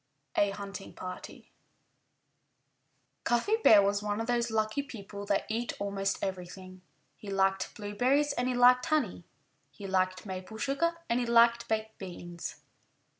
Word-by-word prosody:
*XVII* 205 - +4
*A 195 - -5
HUNTING 200 -1 -8
PARTY* 185 0 -8 1.7
Cuffy 325 - +2
Bear 205 -2 +8
was 200 +1 +1
one 210 0 -2
of 225 - -1
those 235 0 0
lucky 215 +3 0
people 205 -7 -9
that 200 -1 +1
eat 230 +2 -2
almost 195 -1 -2
everything. 185 0 -6 0.4
He 205 - -9
liked 195 0 +1
blueberries 250 +8 +1
and 250 -2 -1
he 255 - 0
liked 250 +1 +6
honey; 255 - 0 0.4
he 205 - -11
liked 185 0 0
maple 190 +2 -6
sugar 280 +8 0
and 235 +1 +1
he 245 - -1
liked 235 0 +5
baked 220 0 -2
beans. 175 -2 -7
210 Hz, 145 wpm, -30 LUFS, 195-240 Hz, 1.7 s, Bear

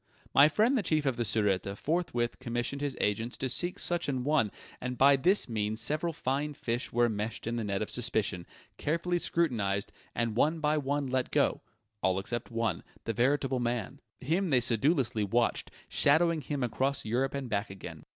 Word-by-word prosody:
My 145 +2 +8
friend 220 - +3
the 245 - +2
Chief 155 -5 0
of 135 -3 +1
the 120 - -3
Sûreté 100 -3 0
forthwith 140 -8 -1
commissioned 120 +2 -3
his 145 -3 -2
agents 115 +4 -1
to 130 - -1
seek 175 +8 -1
such 175 -3 -1
an 130 -3 -1
one, 140 -7 +2 0.3
and 125 0 -3
by 140 +2 +7
this 180 +9 +2
means 110 -2 -2
several 155 +8 0
fine 145 0 -2
fish 120 -1 -3
were 120 +1 +3
enmeshed 110 -1 -3
in 115 +1 -2
the 115 - -2
net 100 0 -1
of - - -6
suspicion, 110 -7 -1 0.3
carefully 170 +3 0
scrutinized, 110 -14 0 0.2
and 115 -2 0
one 155 +7 +2
by 150 0 +2
one 145 -1 0
let 130 -1 0
go - - +2 0.4
all 95 0 +2
except 115 +5 -3
one, 115 -6 -1 0.2
the 115 - -2
veritable 130 +1 +1
man. 120 +2 -2 0.2
Him 170 +8 0
they 130 -4 +4
sedulously 120 -1 +1
watched, 115 +4 +1 0.2
shadowing 160 +2 +3
him 140 -1 -3
across 135 +3 0
Europe 130 +5 0
and 140 -2 -3
back 105 -2 -1
again. 95 -1 -9
125 Hz, 180 wpm, -30 LUFS, 115-145 Hz, 0.4 s, My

